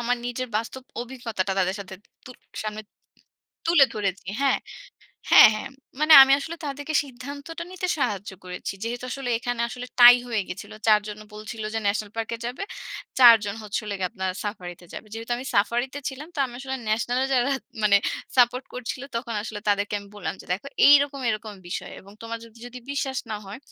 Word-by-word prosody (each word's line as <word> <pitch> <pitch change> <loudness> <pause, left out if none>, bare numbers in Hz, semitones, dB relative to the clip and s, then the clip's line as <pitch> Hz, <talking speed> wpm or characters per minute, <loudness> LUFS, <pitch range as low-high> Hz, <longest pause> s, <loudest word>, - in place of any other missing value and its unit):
আমার 245 +1 +1
নিজের 250 +1 -3
বাস্তব 240 +4 -4 0.2
অভিজ্ঞতাটা 235 -6 -3
তাদের 185 0 +1
সাথে 190 -1 -8 0.3
তু - - -10 0.3
সামনে 215 0 -5 0.8
তুলে 330 -4 +7
ধরেছি। 195 -3 -3 0.2
হ্যাঁ 275 - +3 0.7
হ্যাঁ, - - +10
হ্যাঁ। - - -5 0.3
মানে 310 +1 +5
আমি 270 0 +5
আসলে 325 +4 -6
তাদেরকে 290 +2 -4
সিদ্ধান্তটা 285 +6 -8
নিতে 370 0 -3
সাহায্য 210 -6 -1
করেছি। 180 0 -5
যেহেতু 240 +2 -4
আসলে 270 -3 -4
এখানে 245 0 -3
আসলে 250 +1 -7
টাই 245 0 +11
হয়ে 220 -4 0
গেছিল। 200 +4 -8
৪ 215 -1 +6
জন 210 0 -7 0.2
বলছিল 215 +1 -7
যে 225 - +1
ন্যাশনাল 205 0 0
পার্কে 225 +1 -3
যাবে। 255 +10 -5 0.6
৪ 240 -2 +10
জন 200 0 -3
হচ্ছে 210 +1 -3 0.3
আপনার 190 0 -3
সাফারিতে 180 -4 -6
যাবে। - - -8
যেহেতু 225 +1 -8
আমি 255 +2 -7
সাফারিতে 240 +7 +1
ছিলাম 285 +4 -8
তো - - -8
আমি 240 - -12
আসলে 265 0 -4
ন্যাশনাল 235 +3 0
এ - - 0
যারা 250 +1 +2 0.9
সাপোর্ট 250 +1 +4
করছিল 250 +1 -5
তখন 235 -1 -4
আসলে 210 -1 -6
তাদেরকে 205 0 +1
আমি 200 - -14
বললাম - - -4
যে - - -12
"দেখো 200 +9 -4 0.2
এইরকম 285 -1 +5
এরকম 215 -1 -4
বিষয়। 175 - -5
এবং 200 +1 -16
তোমার 230 0 -5 0.3
যদি 245 +1 -8
বিশ্বাস 270 -2 -2
না 215 - -2
হয় 195 +4 -8
235 Hz, 175 wpm, -25 LUFS, 210-265 Hz, 0.9 s, টাই